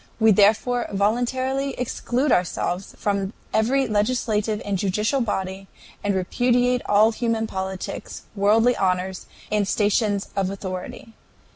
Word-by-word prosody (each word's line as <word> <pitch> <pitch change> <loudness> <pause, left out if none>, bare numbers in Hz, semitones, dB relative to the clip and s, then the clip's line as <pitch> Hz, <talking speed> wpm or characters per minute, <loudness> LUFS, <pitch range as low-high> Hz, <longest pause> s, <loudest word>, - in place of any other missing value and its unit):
We 220 -1 +6
therefore 220 +5 +3
voluntarily 255 +6 0
exclude 250 +2 -1
ourselves 180 +1 -1
from 200 0 -1 0.2
every 260 +5 +2
legislative 215 -1 0
and 200 -1 -1
judicial 210 +8 0
body, 190 -3 -3 0.4
and 205 -1 0
repudiate 245 +6 +1
all 210 +2 +5
human 225 -1 -1
politics, 190 -2 -5
worldly 220 +4 +4
honors, 185 0 -1 0.2
and 210 -2 +1
stations 205 -1 +1
of 195 -2 0
authority. 195 +3 -6
210 Hz, 115 wpm, -23 LUFS, 195-240 Hz, 0.4 s, We